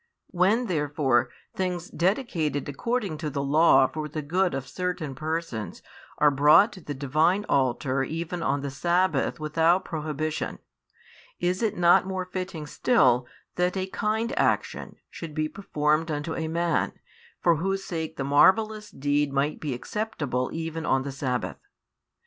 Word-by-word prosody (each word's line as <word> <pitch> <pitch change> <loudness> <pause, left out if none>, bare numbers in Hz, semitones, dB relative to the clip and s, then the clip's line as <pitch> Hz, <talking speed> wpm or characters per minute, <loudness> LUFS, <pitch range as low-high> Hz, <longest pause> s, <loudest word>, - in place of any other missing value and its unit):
When 200 +7 +2
therefore 145 - +1 0.2
things 180 -2 -3
dedicated 170 - 0
according 195 - -2
to 155 -2 -3
the 140 -1 -3
law 140 -1 +5
for 155 +3 -4
the 155 +1 -4
good 180 +2 +1
of 135 -1 -4
certain 180 -5 -3
persons 155 -6 -4 0.3
are 150 -1 +5
brought 150 - +6
to 185 - -11
the 145 -2 -6
Divine 155 +9 +1
altar 130 0 +1
even 165 +4 -4
on 140 -3 0
the 140 -1 -4
sabbath 170 +1 +1
without 165 +4 +2
prohibition, 155 -1 -3 0.8
is 180 +3 0
it 225 -2 0
not 175 +1 +5
more 190 -1 -3
fitting 180 -4 -5
still 130 - +3 0.3
that 180 +1 +1
a 185 - -1
kind 220 +5 -1
action - - 0 0.2
should 160 -3 -8
be 155 -1 0
performed 155 -3 0
unto 150 +1 -3
a 160 - -2
man, 170 +1 0 0.5
for 170 -2 +3
whose 195 +4 -1
sake 160 -4 -4
the 135 - -2
marvellous 210 +10 +3
deed 145 +1 0
might 140 +2 0
be 145 -5 -3
acceptable 140 - -3
even 165 0 -4
on 135 -3 +1
the 140 - -4
sabbath? 130 -2 -3
160 Hz, 150 wpm, -26 LUFS, 145-180 Hz, 0.8 s, brought